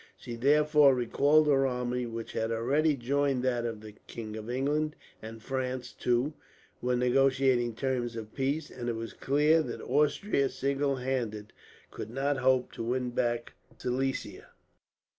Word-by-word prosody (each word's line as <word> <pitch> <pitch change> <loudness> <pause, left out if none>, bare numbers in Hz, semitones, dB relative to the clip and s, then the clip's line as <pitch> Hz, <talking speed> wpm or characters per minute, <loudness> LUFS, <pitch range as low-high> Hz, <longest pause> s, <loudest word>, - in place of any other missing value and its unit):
She 120 - -7
therefore 150 +2 +5
recalled 145 +5 +3
her 135 -2 +3
army, 125 -1 -2
which 115 0 -6
had 115 0 -2
already 140 +7 +2
joined 135 +1 0
that 120 -2 0
of 110 -2 -6
the 110 -1 -10 0.2
king. 110 -2 -7
England 135 +8 -1 0.3
and 110 0 -9
France, 130 -1 -3
too, 125 +5 0 0.5
were 125 0 +1
negotiating 125 -1 +2
terms 120 -2 -2
of 110 -1 -7
peace; 140 +3 -2
and 120 -1 -4
it 115 - -1
was 115 0 -6
clear 150 +4 +3
that - - -5
Austria, 150 -1 +1
single 140 0 0
handed, 120 -5 -3 0.4
could - - -7
not 135 +4 -1
hope 130 -1 +2
to - - -6
win 125 +1 -1
back 120 -1 -1 0.2
Silesia. 135 +2 -3
130 Hz, 145 wpm, -29 LUFS, 120-140 Hz, 0.5 s, therefore